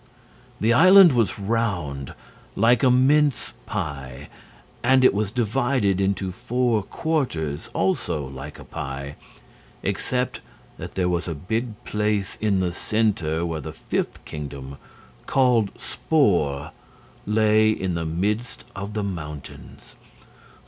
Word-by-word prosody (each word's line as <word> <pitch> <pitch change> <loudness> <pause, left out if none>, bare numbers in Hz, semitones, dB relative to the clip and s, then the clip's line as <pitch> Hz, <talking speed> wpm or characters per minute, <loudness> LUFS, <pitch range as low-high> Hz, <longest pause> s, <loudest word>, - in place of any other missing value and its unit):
The 115 +2 +3
island 185 +3 +8
was 115 -4 +1
round 100 - -2 0.4
like 115 +3 +4
a 130 - +5
mince 140 +3 +3
pie. 70 - -5 0.5
And 130 +1 +4
it - - +6
was 105 0 0
divided 120 -3 +1
into 95 -1 0
four 120 +1 0
quarters 95 - -2
also 90 -5 0
like 65 0 -8
a - - -11
pie 70 +1 -6 0.7
except 125 0 -1 0.4
that - - -8
there 90 -2 +1
was 90 0 -1
a 85 - -3
big 110 - -4
place 105 -1 -1
in 100 -3 +2
the 90 -2 -1
center 90 -7 0
where 80 -2 -3
the - - -7
fifth - - -3
kingdom, 70 -2 -7 0.5
called 125 -6 +3
Spor, 80 - +1 0.6
lay 110 0 +4
in 95 -4 -1
the 85 -1 -2
midst 105 +9 -2
of 100 +2 -6
the 105 - -1
mountains. 75 -7 -8
100 Hz, 120 wpm, -24 LUFS, 80-120 Hz, 0.7 s, island